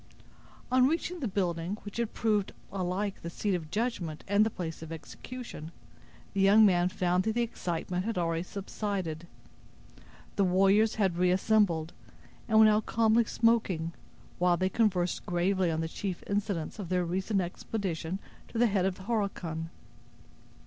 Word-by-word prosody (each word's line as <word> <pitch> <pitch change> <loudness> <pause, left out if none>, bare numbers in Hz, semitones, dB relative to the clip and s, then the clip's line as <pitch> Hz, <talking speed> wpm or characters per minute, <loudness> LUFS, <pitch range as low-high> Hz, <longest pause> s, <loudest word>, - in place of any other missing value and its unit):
On 255 0 +5
reaching 335 +3 -1
the 265 - -1
building, 180 -1 -1
which 205 +1 -8
had 235 -2 -1
proved 210 -3 +1 0.2
alike 195 +1 -2
the 170 - -5
seat 200 +3 -1
of 165 -4 -3
judgment 200 -7 -2
and 200 +1 +4
the 220 - +1
place 165 -6 -6
of 160 0 -8
execution, 165 +1 -8 0.6
the 195 - +1
young 205 +3 +7
man 180 -2 +4
found 180 -1 +1
that 220 - 0
the 240 - +2
excitement 180 -4 -3
had 225 0 -2
already 165 -1 0
subsided. 185 -3 -4 1.1
The 200 - +4
warriors 195 +4 +4
had 190 -5 +1
reassembled, 180 -2 +2 0.5
and 220 - +3
were 220 - +9
now 215 0 +5
calmly 225 +1 +3
smoking, 200 -9 +1 0.5
while 175 -1 +3
they 185 +1 +1
conversed 185 -5 +1
gravely 180 +1 +1
on 160 0 -1
the 160 - -1
chief 185 +2 -4
incidents 200 -4 -2
of 185 -5 -5
their 180 -1 +1
recent 190 +4 0
expedition 180 -1 -3 0.3
to - - -7
the 240 - +5
head 200 -4 +2
of 190 - -2
the 190 - -12
Horican. 190 -7 -2
190 Hz, 155 wpm, -30 LUFS, 175-215 Hz, 1.1 s, were